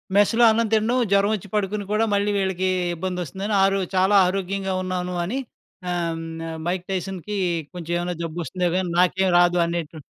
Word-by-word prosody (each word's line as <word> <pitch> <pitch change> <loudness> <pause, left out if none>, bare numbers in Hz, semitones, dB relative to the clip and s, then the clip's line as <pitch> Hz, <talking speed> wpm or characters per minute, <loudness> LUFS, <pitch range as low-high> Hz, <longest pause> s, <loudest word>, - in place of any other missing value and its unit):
మెస్‌లో 215 +4 +4
అన్నం 225 0 +1
తినడం, 225 +4 +2
జ్వరవొచ్చి 200 0 +2
పడుకొని 205 0 -1
కూడా 220 +1 +2
మళ్ళీ 200 +1 +1
వీళ్ళకీ 190 -1 0 0.3
ఇబ్బందొస్తుందని 185 +3 -4
ఆరో 195 0 +3 0.2
చాలా 190 +2 +4
ఆరోగ్యంగా 195 0 -2
ఉన్నాను 180 -1 -3
అని 235 +10 -3 0.5
ఆహ్, 170 -2 -1
హ్మ్, 165 0 -6
'మైక్ 180 0 -2
టైసన్‌'కీ 195 +2 -4 0.4
కొంచెవేమన్నా 175 +1 -3
జబ్బొస్తుందో 175 +2 -2
గానీ, 185 -1 0
నాకేం 185 +1 +3
రాదు 175 0 +4
అనేటువ 170 -2 -4
185 Hz, 140 wpm, -23 LUFS, 175-200 Hz, 0.5 s, మెస్‌లో